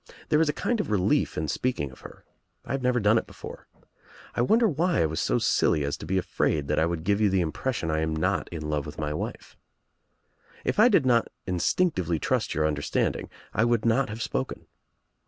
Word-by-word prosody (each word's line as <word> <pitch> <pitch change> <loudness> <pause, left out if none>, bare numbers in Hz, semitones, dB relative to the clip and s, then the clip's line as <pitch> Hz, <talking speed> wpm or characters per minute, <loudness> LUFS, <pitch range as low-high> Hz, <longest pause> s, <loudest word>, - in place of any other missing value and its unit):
There 155 0 +4
is 160 - +2
a 150 - -4
kind 240 -2 +2
of 210 - -2
relief 100 -4 +1
in 80 - -1
speaking 120 - -1
of 65 - -15
her. - - -13 0.4
I - - -6
have 135 - -1
never 125 -1 +2
done 110 +1 +4
it - - -9
before. - - -10 0.7
I - - 0
wonder 225 - +4
why 170 +1 +1
1 80 - +2
was 80 - -2
so - - +1
silly 75 - +2
as 70 0 -1
to - - -9
be 95 - 0
afraid 75 -5 0
that - - +2
I 80 - +3
would 85 -2 -3
give 100 +3 +1
you 105 - +4
the 95 -1 +2
impression 85 +2 -2
I 80 - 0
am 80 0 -1
not 80 - 0
in 80 -3 -5
love 75 -1 -2
with 75 - -9
my 75 -1 -2
wife. - - -6 1.1
If - - 0
I 235 +3 +7
did 175 - +4
not 120 -2 +3 0.2
instinctively 90 - +1
trust - - -1
your 75 +1 +1
understanding 75 -2 -1 0.2
I 110 - +2
would 120 -1 +1
not 120 +3 +2
have 110 +1 -4
spoken. - - -3
100 Hz, 215 wpm, -26 LUFS, 80-130 Hz, 1.1 s, I